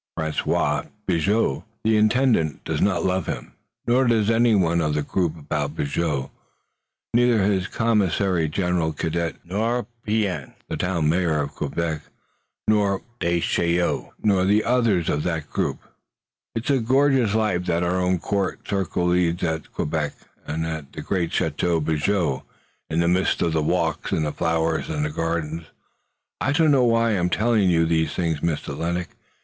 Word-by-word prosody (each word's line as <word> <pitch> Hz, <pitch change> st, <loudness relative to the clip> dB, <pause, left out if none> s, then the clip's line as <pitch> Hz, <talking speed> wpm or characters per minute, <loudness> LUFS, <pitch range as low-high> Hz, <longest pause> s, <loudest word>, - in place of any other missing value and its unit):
François 80 Hz, -2 st, 0 dB, 0.2 s
Bigot, 95 Hz, -3 st, +1 dB, 0.2 s
the 110 Hz, 0 st, +3 dB
Intendant, 110 Hz, -, +2 dB
does -, -, -2 dB
not 100 Hz, -, +2 dB
love 95 Hz, 0 st, 0 dB
him, -, -, -5 dB, 0.3 s
nor 125 Hz, +2 st, +3 dB
does 115 Hz, -2 st, +3 dB
anyone 100 Hz, -8 st, +3 dB
of 75 Hz, -2 st, 0 dB
the 75 Hz, -, 0 dB
group 85 Hz, +1 st, -1 dB
about 75 Hz, 0 st, -3 dB
Bigot, 70 Hz, -2 st, -1 dB, 0.8 s
neither 120 Hz, -3 st, +4 dB
his 95 Hz, -1 st, +1 dB
commissary 95 Hz, -7 st, +1 dB
general, 90 Hz, -1 st, 0 dB
Cadet, 80 Hz, -1 st, -2 dB
nor 110 Hz, +6 st, -1 dB, 0.2 s
Pean, 100 Hz, -, -1 dB
the -, -, -3 dB
Town 90 Hz, -4 st, 0 dB
Mayor 80 Hz, -1 st, +2 dB
of 70 Hz, 0 st, -3 dB
Quebec, 80 Hz, -2 st, -2 dB, 0.7 s
nor 100 Hz, -3 st, +2 dB, 0.2 s
Descheneaux, 85 Hz, 0 st, 0 dB
nor 100 Hz, -3 st, +3 dB
the 105 Hz, +2 st, +3 dB
others 115 Hz, -9 st, +2 dB
of 75 Hz, -, 0 dB
that 80 Hz, -3 st, -3 dB
group. -, -, -1 dB, 0.8 s
It's 115 Hz, +5 st, -1 dB
a 135 Hz, -, +3 dB
gorgeous 130 Hz, -2 st, +3 dB
life 100 Hz, -5 st, 0 dB
that 85 Hz, 0 st, +1 dB
our 90 Hz, +1 st, +1 dB
own 90 Hz, 0 st, +2 dB
court 100 Hz, +2 st, -2 dB
circle 95 Hz, -2 st, -1 dB
leads 90 Hz, -1 st, +1 dB
at 80 Hz, -2 st, -2 dB
Quebec, 75 Hz, -2 st, -2 dB, 0.3 s
and 80 Hz, +1 st, -2 dB
at 80 Hz, -4 st, -5 dB
the -, -, -6 dB
great 90 Hz, -4 st, -1 dB
Chateau 80 Hz, +2 st, 0 dB
Bigot, 80 Hz, -1 st, 0 dB, 0.5 s
in 80 Hz, +2 st, +1 dB
the 85 Hz, -, +2 dB
midst 90 Hz, +2 st, +2 dB
of 80 Hz, -1 st, 0 dB
its 80 Hz, -, +2 dB
walks -, -, 0 dB
and 75 Hz, -2 st, -1 dB
flowers 80 Hz, 0 st, 0 dB
and 75 Hz, -1 st, -2 dB
gardens. 80 Hz, 0 st, -2 dB, 0.8 s
I 135 Hz, -, +1 dB
don't 160 Hz, 0 st, +4 dB
know 130 Hz, -3 st, +4 dB
why 115 Hz, -1 st, +3 dB
I'm 90 Hz, -4 st, +1 dB
telling 110 Hz, -1 st, +2 dB
you 85 Hz, -1 st, +3 dB
these 80 Hz, -1 st, +1 dB
things, 80 Hz, -4 st, 0 dB
Mr. 80 Hz, -2 st, -2 dB
Lennox! 85 Hz, -1 st, -3 dB
90 Hz, 155 wpm, -23 LUFS, 80-105 Hz, 0.8 s, neither